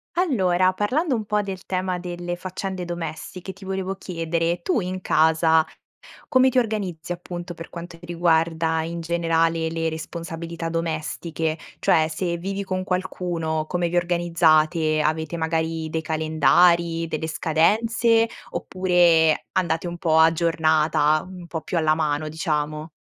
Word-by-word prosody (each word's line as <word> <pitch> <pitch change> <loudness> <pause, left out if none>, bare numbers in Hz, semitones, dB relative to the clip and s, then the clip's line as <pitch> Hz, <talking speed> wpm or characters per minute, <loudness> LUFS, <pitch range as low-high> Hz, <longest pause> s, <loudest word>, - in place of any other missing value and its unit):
Allora, 185 - +2
parlando 260 - 0
un 220 -3 -1
po' 210 0 0
del 190 -2 -7
tema 185 -1 -1
delle 175 0 -4
faccende 185 0 -5
domestiche, 175 +2 -6
ti 195 +1 -13
volevo 190 0 -2
chiedere, 165 -1 -2
tu 365 - +1
in 185 +1 -4
casa 160 0 +4 0.7
come 260 0 +5
ti 260 - -3
organizzi 195 -8 -2
appunto 175 0 -6
per 165 -1 -9
quanto 170 0 -9
riguarda 165 -1 +1
in 170 +1 -4
generale 165 -1 +1
le 165 0 -1
responsabilità 165 +1 -6
domestiche? 165 0 -2 0.2
Cioè 155 -1 +3
se 170 +2 -2
vivi 195 +3 -3
con 185 -1 -2
qualcuno, 175 -4 -2
come 175 0 -1
vi 175 - -1
organizzate? 165 -2 +2
Avete 160 +2 -1
magari 160 0 -1
dei 160 - -1
calendari, 165 +2 +3
delle 160 0 -3
scadenze 225 +9 +2 0.3
oppure 175 -3 +3
andate 175 -1 0
un 175 - -6
po' 160 -2 +2
a 160 0 +6
giornata, 155 -2 +2
un 180 -2 -10
po' 160 -1 -4
più 165 +3 -4
alla 155 -2 +3
mano 155 -1 -1
diciamo? 155 0 -2
170 Hz, 140 wpm, -23 LUFS, 160-185 Hz, 0.7 s, a